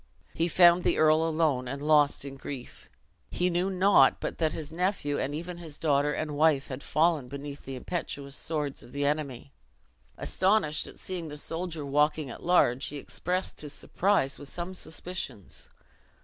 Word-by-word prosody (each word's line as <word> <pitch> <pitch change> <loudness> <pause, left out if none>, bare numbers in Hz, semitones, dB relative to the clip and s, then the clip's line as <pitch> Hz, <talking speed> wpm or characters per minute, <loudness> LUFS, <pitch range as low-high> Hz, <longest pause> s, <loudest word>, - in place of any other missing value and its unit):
He 165 - +1
found 175 +1 +6
the - - +2
earl 155 0 +5
alone, 155 -6 +1
and 140 +3 -4
lost 150 -1 +3
in 140 - -6
grief. 135 -2 -8 0.4
He 180 0 0
knew 175 +2 +1
not 195 +1 +5
but - - -4
that 160 -2 +2
his 155 -2 -6
nephew, 170 -4 -1
and 140 +2 -2
even 170 +2 -6
his 160 -4 -6
daughter 145 -2 +2
and 155 0 -3
wife, 150 -2 +3
had 130 0 -5
fallen 155 -4 +1
beneath 140 +2 -8
the 135 - -5
impetuous 140 -2 -4
swords 150 -3 -3
of - - -14
the 145 0 -1
enemy. 140 - -2 0.6
Astonished 185 -6 +1
at - - -12
seeing 180 -3 -5
the 150 -1 -7
soldier 165 0 -4
walking 150 0 +1
at - - -9
large, 135 -7 +3
he 150 - -5
expressed 180 +6 -2
his 150 -1 -6
surprise 185 -5 0
with 145 - -7
some 175 +2 -5
suspicions. 160 - -5
155 Hz, 170 wpm, -28 LUFS, 140-175 Hz, 0.6 s, found